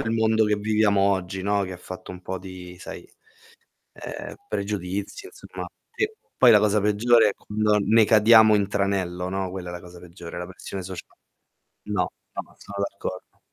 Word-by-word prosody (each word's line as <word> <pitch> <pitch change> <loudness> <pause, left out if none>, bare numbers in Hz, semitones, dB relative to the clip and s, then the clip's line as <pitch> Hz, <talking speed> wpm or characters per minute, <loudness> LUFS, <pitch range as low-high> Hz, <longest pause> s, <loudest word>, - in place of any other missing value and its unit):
il 115 - -2
mondo 110 -1 +3
che 105 0 +2
viviamo 105 -1 +2
oggi, 95 -1 0
no, 100 0 +1
che 95 -1 -5
fatto 90 +1 -9
un 90 - -10
po' 95 +1 -4
di 90 -1 -10
sai, - - -9 0.9
ehm, - - -7
pregiudizio 100 - -4
insomma. 415 - -8 0.3
E 425 0 0 0.2
poi 125 - +7
la 105 - +8
cosa 105 0 +3
peggiore 110 +2 +4
è - - -8
quando 105 0 0
ne 110 +2 +5
cadiamo 110 0 +7
in 100 -2 +2
tranello, 95 -3 -1
no. 95 -1 -2
Quella 90 -1 -6
è - - -7
la 90 - -6
cosa 90 0 -13
peggiore, 85 -1 -9
la 90 - -5
pressione 95 +1 -7
socia 90 -2 -7 0.8
no, 105 -3 0 0.3
no. - - -7
Sono 100 0 -4
d'accordo. 95 -2 -8
100 Hz, 175 wpm, -25 LUFS, 95-105 Hz, 0.9 s, la